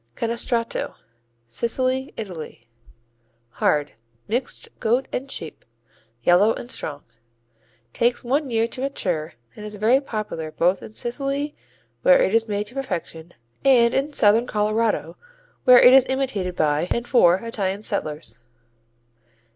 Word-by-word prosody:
Canestrato 230 0 -2 0.5
Sicily, 255 - -1
Italy 165 - -8 0.9
Hard; 150 -1 +2 0.4
mixed 245 +4 -3
goat 245 +4 +1
and 270 +2 -3
sheep; 160 - -7 0.6
yellow 190 - +4
and 240 - -8
strong. 145 -2 -4 0.9
Takes 240 +1 +1
one 275 +3 0
year 225 -1 +1
to 255 - -6
mature 180 - -2 0.2
and 210 - -10
is 210 0 -7
very 230 +6 +3
popular 215 - -5
both 180 +4 +1
in 215 - -11
Sicily 275 +4 -2 0.5
where - - +6
it - - +2
is 225 0 +2
made 205 0 -2
to 220 - -11
perfection 175 -10 -5 0.3
and 245 -3 +5
in 280 +3 0
Southern 225 -2 +4
Colorado 215 +1 0 0.5
where 250 -1 +9
it 250 - +8
is 265 -1 +6
imitated 250 -9 -2
by 155 +2 +1
and 235 0 -1
for 180 -9 +5
Italian 200 -2 -3
settlers. 150 - -3
225 Hz, 130 wpm, -23 LUFS, 185-255 Hz, 0.9 s, where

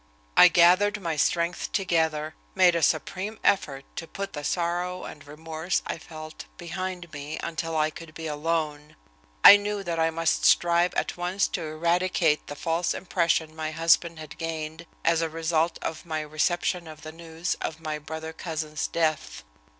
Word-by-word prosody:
I - - +10
gathered 185 +5 +4
my 165 -4 -2
strength 170 +3 0
together, 160 -5 0 0.2
made 185 -2 +6
a 170 - 0
supreme 185 +7 0
effort 140 -8 +1
to 165 - -5
put 200 +3 -6
the 145 - -5
sorrow 175 +2 -1
and 145 -1 -10
remorse 160 +3 -3
I - - -4
felt 155 -1 -10
behind 175 0 -5
me 145 +2 -6
until 165 -1 -3
I 155 0 +2
could 160 0 -11
be 160 - -6
alone. 150 -1 -2 0.5
I 205 - +12
knew 205 0 -3
that 170 -2 -2
I 160 0 +3
must 165 0 0
strive 175 +1 +4
at - - -1
once 180 +2 0
to - - -3
eradicate 170 0 +1
the 145 - -6
false 165 +3 -1
impression 170 -3 0
my 155 -1 -3
husband 165 +1 +2
had 155 -1 -10
gained 160 0 -5 0.2
as 165 -1 +3
a 165 - 0
result 165 +1 0
of 160 - -4
my 160 -3 -3
reception 170 +3 -1
of 155 0 -11
the 155 - -7
news 165 +1 -4
of 160 - -4
my 155 -2 -4
brother 160 +1 -7
cousin's 155 -2 -3
death. 160 -2 -1
165 Hz, 165 wpm, -26 LUFS, 155-175 Hz, 0.5 s, I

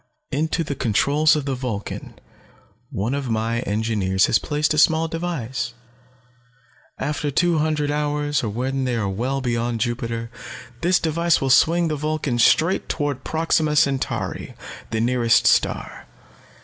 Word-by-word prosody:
"Into 160 +4 0
the 145 - -3
controls 140 +6 +2
of 150 -2 -2
the 140 - -1
Vulcan 125 -6 -5 0.7
one 110 +7 -2
of 140 -3 -3
my 115 +1 0
engineers 105 -4 +1
has 110 - +3
placed 150 +1 0
a 155 - +1
small 160 +1 +4
device. 135 -8 -4 1.2
After 150 0 -2
two 170 +3 +2
hundred 150 -1 0
hours, 145 -1 -1
or 110 - -1
when 130 +5 -2
they 125 -1 -1
are 110 -3 -1
well 125 +8 -2
beyond 120 -1 -1
Jupiter, 115 0 -3 0.5
this 180 +1 +3
device 170 +1 +1
will 135 -1 0
swing 170 +5 +4
the 155 - -1
Vulcan 150 -4 -2
straight 165 +9 +3
toward 145 -4 -2
Proxima 160 -1 +1
Centauri, 140 -2 0 0.3
the 110 - -2
nearest 120 0 +3
star. - - +1
135 Hz, 140 wpm, -22 LUFS, 115-155 Hz, 1.2 s, small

